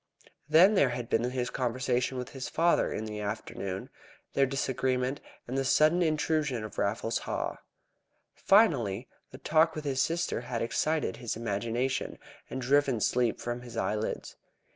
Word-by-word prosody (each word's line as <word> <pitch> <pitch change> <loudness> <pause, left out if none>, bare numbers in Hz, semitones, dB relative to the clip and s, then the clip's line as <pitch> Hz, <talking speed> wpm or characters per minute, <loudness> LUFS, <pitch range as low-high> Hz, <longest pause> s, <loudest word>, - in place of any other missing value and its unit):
Then 175 +7 +7
there 140 -10 +4
had 120 -1 -4
been 115 - +2
his 125 -1 -2
conversation 125 +1 -1
with 125 - -4
his 135 -2 -6
father 170 +1 +2
in 110 - -3
the 105 -1 -5
afternoon, 100 -2 -5 0.4
their 135 0 +3
disagreement, 130 0 -1 0.3
and 125 - -4
the 135 - +1
sudden 155 +6 +4
intrusion 155 -6 0
of 110 - -7
Raffles 110 +3 0
Haw. - - -3 0.8
Finally 130 - +3 0.2
the 130 - -11
talk 160 +3 +3
with 155 -1 -5
his 135 -2 +1
sister 165 -6 0
had 120 -1 -3
excited 155 +6 0
his 120 - -4
imagination, 115 +4 -2 0.3
and 130 - -4
driven 135 -1 +2
sleep 120 +1 +1
from 120 0 -4
his 120 -1 -9
eyelids. 105 +1 -2
125 Hz, 150 wpm, -29 LUFS, 115-145 Hz, 0.8 s, Then